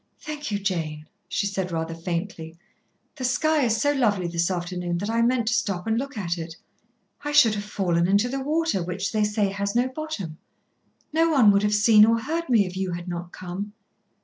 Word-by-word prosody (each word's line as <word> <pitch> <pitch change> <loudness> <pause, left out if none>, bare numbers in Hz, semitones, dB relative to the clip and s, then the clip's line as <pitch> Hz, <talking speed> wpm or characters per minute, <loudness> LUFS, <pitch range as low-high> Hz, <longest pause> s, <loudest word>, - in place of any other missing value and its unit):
"Thank 300 -1 -6
you, 205 - 0
Jane," 165 -6 -3 0.2
she - - 0
said 190 -2 -2
rather 165 0 -2
faintly. 165 -1 -5 0.6
"The 260 - -5
sky 305 +5 +2
is 225 -1 +1
so 285 +5 +3
lovely 215 -10 +1
this 170 0 0
afternoon 175 -1 -2
that 205 +5 -3
I 230 0 +1
meant 240 -1 +2
to - - +1
stop 190 -6 -1
and 225 - +1
look 275 -1 -5
at 175 -3 -2
it. 165 0 -6 0.7
I 295 - -2
should 290 -7 +6
have 205 -1 -3
fallen 175 -5 0
into 200 +5 +3
the 270 +2 -3
water, 310 - 0
which 180 +3 -3
they 215 -1 +1
say 210 -1 +1
has 200 +1 -3
no 245 +2 +3
bottom. 260 - -6 0.7
No 325 +1 +3
one 260 -10 +6
would 200 0 +3
have 210 0 +2
seen 210 0 +6
or 230 +1 +5
heard 325 +6 -3
me 225 -5 +4
if 180 0 -7
you 190 -1 -2
had 175 +1 -6
not 175 0 -5
come." 185 +3 -6
205 Hz, 205 wpm, -25 LUFS, 175-245 Hz, 0.7 s, should